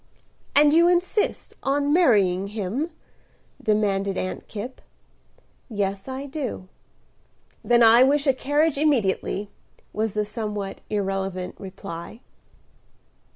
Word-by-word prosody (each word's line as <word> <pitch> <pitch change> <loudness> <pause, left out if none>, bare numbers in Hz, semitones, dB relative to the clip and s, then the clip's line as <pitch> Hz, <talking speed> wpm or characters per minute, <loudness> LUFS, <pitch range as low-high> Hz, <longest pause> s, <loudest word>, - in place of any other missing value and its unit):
"And 295 +1 +6
you 340 +2 +6
insist 360 +4 0
on 285 +1 +1
marrying 200 - +3
him?" 215 - -3 0.7
demanded 200 -2 +1
Aunt 185 - -4
Kipp. 220 +5 -7 0.9
"Yes, 200 -2 -2
I 265 +1 -5
do." 265 -9 -5 1.0
"Then 240 -1 +4
I 230 +2 +7
wish 280 +2 +4
a 270 - +4
carriage 290 +3 +1
immediately," 210 -7 0 0.4
was 215 -1 -2
the 210 0 0
somewhat 210 -2 -5
irrelevant 195 -3 -2
reply. 190 +2 -8
220 Hz, 105 wpm, -24 LUFS, 195-280 Hz, 1.0 s, I